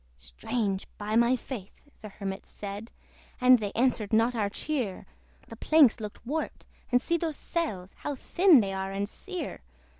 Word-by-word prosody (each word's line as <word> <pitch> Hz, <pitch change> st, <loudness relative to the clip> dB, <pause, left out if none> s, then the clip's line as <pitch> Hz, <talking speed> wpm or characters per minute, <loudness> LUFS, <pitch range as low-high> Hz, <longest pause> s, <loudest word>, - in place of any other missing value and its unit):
"Strange, 195 Hz, -, -3 dB
by 210 Hz, +1 st, -2 dB
my 235 Hz, +2 st, +5 dB
faith!" 235 Hz, -6 st, -8 dB, 0.2 s
the 215 Hz, -, -9 dB
Hermit 195 Hz, -1 st, -6 dB
said 205 Hz, +2 st, -7 dB, 0.5 s
"And 250 Hz, -1 st, +7 dB
they 205 Hz, -2 st, -3 dB
answered 235 Hz, -4 st, +1 dB
not 230 Hz, +2 st, +3 dB
our 210 Hz, -3 st, 0 dB
cheer! 240 Hz, -7 st, -3 dB, 0.4 s
The 225 Hz, -, -9 dB
planks 285 Hz, 0 st, +5 dB
looked 210 Hz, +1 st, -8 dB
warped! 310 Hz, +6 st, -3 dB, 0.3 s
and 245 Hz, -, +5 dB
see 340 Hz, +6 st, 0 dB
those 320 Hz, -3 st, -2 dB
sails, 200 Hz, -, -3 dB
How 290 Hz, -, -3 dB
thin 340 Hz, +1 st, +5 dB
they 195 Hz, -2 st, -2 dB
are 190 Hz, 0 st, -3 dB
and 200 Hz, +1 st, -2 dB
sere! 365 Hz, -, -6 dB
225 Hz, 160 wpm, -28 LUFS, 200-265 Hz, 0.5 s, And